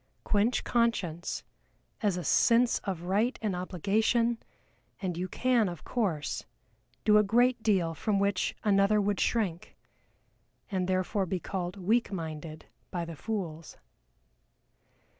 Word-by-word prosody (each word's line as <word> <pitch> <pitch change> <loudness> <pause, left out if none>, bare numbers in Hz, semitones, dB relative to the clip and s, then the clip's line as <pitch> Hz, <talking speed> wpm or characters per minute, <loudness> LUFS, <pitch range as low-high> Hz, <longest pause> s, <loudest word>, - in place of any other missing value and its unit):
Quench 215 +4 +2
conscience, 200 -8 0 0.6
as 205 -5 +1
a 180 - -3
sense 235 +6 +4
of 185 -4 -4
right 205 +8 +1
and 210 -4 -1
obligation, 220 +6 +1 0.6
and 185 -4 -2
you 180 +2 -2
can, 240 0 +2
of 175 -2 -8
course, 185 -11 -1 0.6
do 210 -1 +6
a - - +4
great 240 +4 +3
deal 185 -7 +2
from 205 +5 0
which 200 -1 0
another 200 0 +4
would 205 -1 0
shrink 195 -8 -1 0.9
and 185 -2 0
therefore 185 +1 0
be 185 +1 -1
called 180 +1 -4
"weak 215 +6 +1
minded" 160 -3 -6 0.2
by 175 -2 -3
the 165 -1 -7
fools. 165 -5 -5
195 Hz, 125 wpm, -29 LUFS, 175-220 Hz, 0.9 s, do